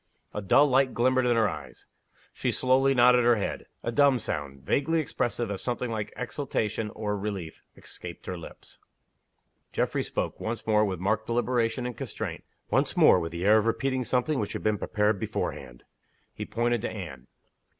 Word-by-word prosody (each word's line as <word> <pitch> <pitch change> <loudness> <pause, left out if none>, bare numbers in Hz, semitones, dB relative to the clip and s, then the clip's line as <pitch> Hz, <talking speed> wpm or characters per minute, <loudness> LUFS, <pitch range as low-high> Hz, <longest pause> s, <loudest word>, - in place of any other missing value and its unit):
A 105 - -3
dull 120 +9 +5
light 135 -1 +2
glimmered 130 +1 +3
in 120 - +3
her 110 -2 +4
eyes. 95 - -8 0.5
She - - -1
slowly 135 +1 +3
nodded 125 0 +6
her 120 0 +5
head. 105 - -3 0.2
A 120 - -1
dumb 140 +1 +4
sound, 70 - -5
vaguely 155 - +1
expressive 120 -7 -2
of 100 - -4
something 125 -1 -2
like 110 -2 -3
exultation 115 -4 -2
or 105 -1 -2
relief, 100 -5 -5 0.2
escaped - - -10
her 90 - -4
lips. 85 - -12 0.9
Geoffrey - - 0
spoke - - -3
once 115 +1 -4
more, 105 -1 +4
with 95 -4 -1
marked 110 +4 0
deliberation 120 0 0
and 125 -1 -4
constraint; - - -5 0.3
once - - +1
more, - - +7
with 85 -1 -4
the 85 +2 -4
air 110 +2 +6
of 110 - -1
repeating 130 +2 0
something 130 +4 0
which 105 - -2
had - - -5
been 105 -2 +1
prepared 105 -1 +1
beforehand. 65 -7 -4 0.5
He - - -5
pointed 120 -1 0
to - - -2
Anne. - - -8
115 Hz, 175 wpm, -27 LUFS, 105-125 Hz, 0.9 s, more